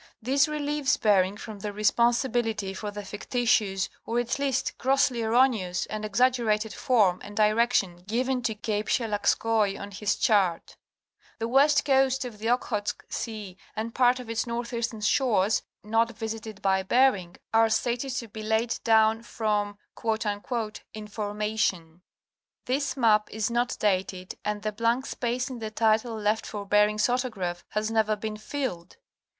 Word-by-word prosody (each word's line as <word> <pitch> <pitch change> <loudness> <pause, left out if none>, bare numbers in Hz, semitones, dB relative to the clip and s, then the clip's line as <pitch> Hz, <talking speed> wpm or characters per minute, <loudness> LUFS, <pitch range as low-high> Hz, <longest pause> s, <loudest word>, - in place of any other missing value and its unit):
This 275 +6 +2
relieves 295 -1 0
Bering 200 -2 +3
from 215 -1 -8
the 205 +1 -4
responsibility 225 -1 +1
for 210 +2 -5
the 205 0 -7
fictitious 205 -2 0 0.2
or 230 - -2
at 240 +3 -1
least 275 -2 0
grossly 260 -2 +2
erroneous 225 -6 +2
and 215 0 -5
exaggerated 220 -1 +1
form 205 -8 +2
and 205 0 -10
direction 215 -4 +2
given 250 +4 0
to 230 -2 -1
Cape 210 0 -2
Shelagskoi 215 -2 +1
on 200 0 -7
his 205 +1 -1
chart. 190 -6 +1 0.6
The 225 - -2
west 285 +4 +4
coast 265 -2 +3
of 225 -4 -8
the 225 +2 -2
Okhotsk 230 -4 -1
sea 210 -5 -5 0.2
and 225 +1 -4
part 250 0 +3
of 250 - -8
its 230 +2 -2
northeastern 235 -1 -3
shores 215 -3 +2 0.2
not 225 +1 +1
visited 220 -2 -6
by 190 -1 +3
Bering 195 -4 +2 0.2
are 225 0 +5
stated 245 +4 0
to 235 - -3
be 215 +1 -8
laid 220 +2 0
down 220 -1 +4
from 210 -3 -2 0.2
''information." 210 -4 -3 0.6
This 270 +1 -1
map 215 -4 +3
is 220 +1 -2
not 240 +1 0
dated 185 -2 -1
and 210 0 -3
the 215 - -1
blank 230 +4 0
space 245 +2 -2
in 250 - -6
the 220 -1 -4
title 220 +1 +1
left 215 +1 0
for 205 -1 -6
Bering's 210 +1 +3
autograph 215 -9 -2
has 215 +1 -2
never 220 -1 +2
been 215 +1 -5
filled. 215 -7 -5
220 Hz, 145 wpm, -27 LUFS, 210-240 Hz, 0.6 s, are